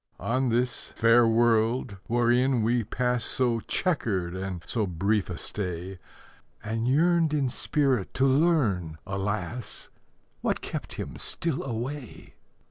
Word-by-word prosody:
On 130 +2 0
this 120 +2 0
fair 115 +1 +4
world, 115 -1 +2
wherein 120 +1 +2
we 120 +1 +2
pass 125 +2 -1
So 120 -2 +1
chequered 105 - -1
and 95 -2 -5
so 110 -4 -1
brief 100 +4 0
a 90 - -4
stay, 90 -1 -4 0.6
And 115 +2 -2
yearned 160 +3 +3
in 140 -3 +1
spirit 135 -9 0
to 135 - +3
learn, 130 - +2
alas! 105 +5 -4 0.5
What - - -1
kept - - -6
him - - -6
still 165 -5 -1
away. 125 +1 -6
115 Hz, 125 wpm, -27 LUFS, 100-130 Hz, 0.6 s, fair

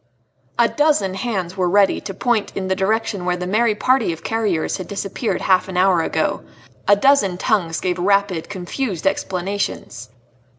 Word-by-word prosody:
A 235 - +5
dozen 290 -12 +1
hands 190 -3 -3
were 185 -2 0
ready 200 +1 +3
to 195 - -6
point 230 0 0
in 190 -1 -2
the 190 - +1
direction 205 0 -1
where 180 0 0
the 180 - -4
merry 215 +3 +2
party 255 -3 +2
of 165 - -8
carriers 210 -8 -1
had 185 - -7
disappeared 200 0 -3
half 185 -1 +2
an 185 -1 -5
hour 185 -2 +4
ago; - - -1 0.5
a 205 - +7
dozen 205 -5 +3
tongues 180 -6 0
gave 180 -1 -2
rapid, 195 -2 +1
confused 195 - -4
explanations. 195 - -2
195 Hz, 165 wpm, -20 LUFS, 180-215 Hz, 0.5 s, a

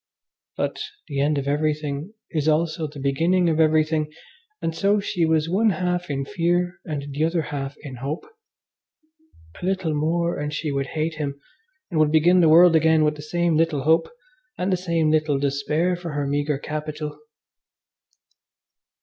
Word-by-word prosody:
But - - -2 0.3
the 140 - -3
end 145 +1 +2
of 140 0 -2
everything 150 +4 -1 0.2
is 155 -3 -1
also 160 0 +1
the 145 -1 -10
beginning 165 +7 +2
of 160 -1 0
everything, 155 -1 +2 0.5
and 165 - -2
so 200 +4 +2
she 180 -4 0
was 160 -1 +2
one 205 +6 +3
half 180 -1 -1
in 140 -1 -2
fear 175 0 0
and 145 -3 -5
the 145 +3 0
other 165 0 +1
half 140 0 -4
in 135 -4 -8
hope. 140 +6 -4 1.4
A - - -10
little 185 -3 0
more 170 +3 0
and 150 0 -3
she 155 0 -3
would 140 0 -1
hate 160 +1 0
him, 140 -2 -4 0.5
and 160 - 0
would 155 -1 +4
begin 170 +4 +5
the 165 -3 +5
world 170 +1 +7
again 160 0 +4
with 150 0 +2
the 150 - -9
same 170 +2 0
little 155 -3 +1
hope 160 +2 +3 0.5
and 185 +1 0
the - - +4
same 170 -3 0
little 155 -2 +2
despair 145 +5 0
for 175 -3 -6
her 145 -1 -1
meagre 145 +1 0
capital. 150 0 -5
155 Hz, 165 wpm, -23 LUFS, 150-170 Hz, 1.4 s, world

